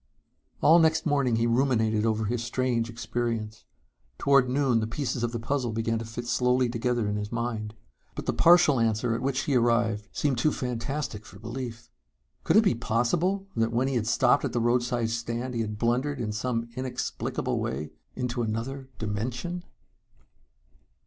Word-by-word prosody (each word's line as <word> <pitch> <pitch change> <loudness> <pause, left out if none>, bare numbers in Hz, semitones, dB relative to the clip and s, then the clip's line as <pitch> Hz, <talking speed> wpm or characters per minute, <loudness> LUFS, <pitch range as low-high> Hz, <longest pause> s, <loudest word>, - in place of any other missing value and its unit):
All 165 +3 +7
next 160 -1 +3
morning 140 -6 +2
he 115 +1 +1
ruminated 115 -3 +2
over 110 0 0
his 115 +2 -1
strange 120 -1 0
experience. 115 -2 -3 0.5
Toward 135 -2 +4
noon 130 -3 +2
the 110 - -1
pieces 125 +1 -3
of 120 -1 0
the 120 - -3
puzzle 120 0 -1
began 115 0 -1
to 115 - -5
fit 115 +2 -6
slowly 125 +1 +2
together 120 -1 0
in 105 0 -1
his 105 0 -4
mind. 115 -2 -3 0.4
But - - -5
the - - 0
partial 170 -6 +6
answer 115 +1 +1
at 115 - -2
which 135 0 0
he 140 - -1
arrived 115 -4 +2
seemed 135 -5 0
too 155 +5 +3
fantastic 125 -2 -3
for 100 - -13
belief. 115 +1 -7 0.5
Could - - +2
it 220 - +7
be 200 - +3
possible 155 - 0
that 115 0 +1
when 125 +3 +1
he 135 - -1
had 115 -3 0
stopped - - +3
at - - -2
the 120 - +1
roadside 120 0 +1
stand 115 +2 -3
he 115 - -1
had 105 -1 -3
blundered, 125 +5 0
in 110 -3 -2
some 115 +2 -2
inexplicable 130 -1 -2
way, 75 +3 -3 0.2
into 125 -1 -2
another 120 +5 -3
dimension? 125 +11 -3
120 Hz, 170 wpm, -27 LUFS, 115-130 Hz, 0.5 s, All